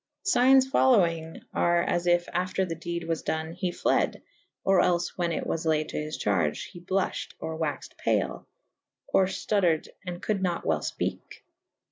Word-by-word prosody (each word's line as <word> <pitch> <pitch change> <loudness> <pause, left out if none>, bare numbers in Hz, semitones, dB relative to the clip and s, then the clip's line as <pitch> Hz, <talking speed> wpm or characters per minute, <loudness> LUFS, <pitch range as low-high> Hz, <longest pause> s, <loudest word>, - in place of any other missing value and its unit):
Signes 265 -7 +5
folowynge 170 - +2
are 170 0 +3
as 175 0 -1
yf 175 0 +3
after 185 +1 0
the 170 - -4
dede 170 +1 -4
was 165 -1 -1
done 160 0 -2
he 180 +1 -2
fled - - 0 0.2
/ - - -48
or 195 -1 +5
els 175 -1 +2
whan 175 -2 0
it - - -2
was 160 - -2
layed 155 -1 +1
to - - -5
his 155 +1 -5
charge: 85 -7 0
he 175 - -10
bluff 185 +2 -1
hed - - -17
or 160 - -5
waxed 160 -3 -4
pale - - 0 0.3
/ - - -63
or 190 - +5
ftutted 185 -4 +1
and 175 -2 -5
coulde 205 -1 -1
nat 175 -2 -1
well 80 -1 +2
fpeke. - - -4
175 Hz, 180 wpm, -27 LUFS, 160-185 Hz, 0.3 s, Signes